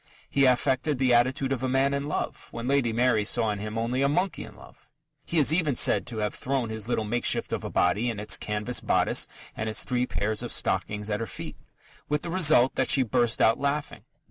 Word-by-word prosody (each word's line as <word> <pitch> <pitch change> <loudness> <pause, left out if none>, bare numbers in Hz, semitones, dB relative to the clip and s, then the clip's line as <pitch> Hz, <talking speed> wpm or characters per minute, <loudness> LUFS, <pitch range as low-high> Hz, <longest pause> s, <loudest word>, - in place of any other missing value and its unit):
He 140 -1 +2
affected 130 +3 +1
the 130 -1 +2
attitude 130 +3 +2
of 130 -3 -1
a 130 - -1
man 135 +2 +1
in 140 +1 -2
love, - - -4
when 115 +1 -6
Lady 135 -4 +1
Mary 115 -1 +2
saw 110 +1 +1
in 105 - -4
him 105 +2 -5
only 120 +3 -1
a 140 - +2
monkey 180 +6 -1
in - - -12
love. - - -17 0.4
He 170 - -2
is 150 0 +5
even 160 -6 +1
said - - +3
to 120 -2 -6
have 105 -1 -2
thrown 130 -3 -2
his 110 -1 -3
little 110 -3 -1
makeshift 120 +3 0
of - - -3
a - - -4
body, 100 +7 +1
in 110 -3 -4
its 105 - +1
canvas 105 +4 -3
bodice - - +2 0.3
and 110 0 -3
its 110 - +2
three 125 0 -1
pairs 105 +1 -2
of - - -5
stockings, 105 +1 -1
at 105 - -1
her 115 - -4
feet, - - -7 0.5
with 150 0 -1
the 170 - -3
result 155 -8 +4
that - - -1
she 135 - +4
burst 120 -1 0
out 110 - +4
laughing. 145 +1 -2
125 Hz, 225 wpm, -26 LUFS, 110-140 Hz, 0.5 s, is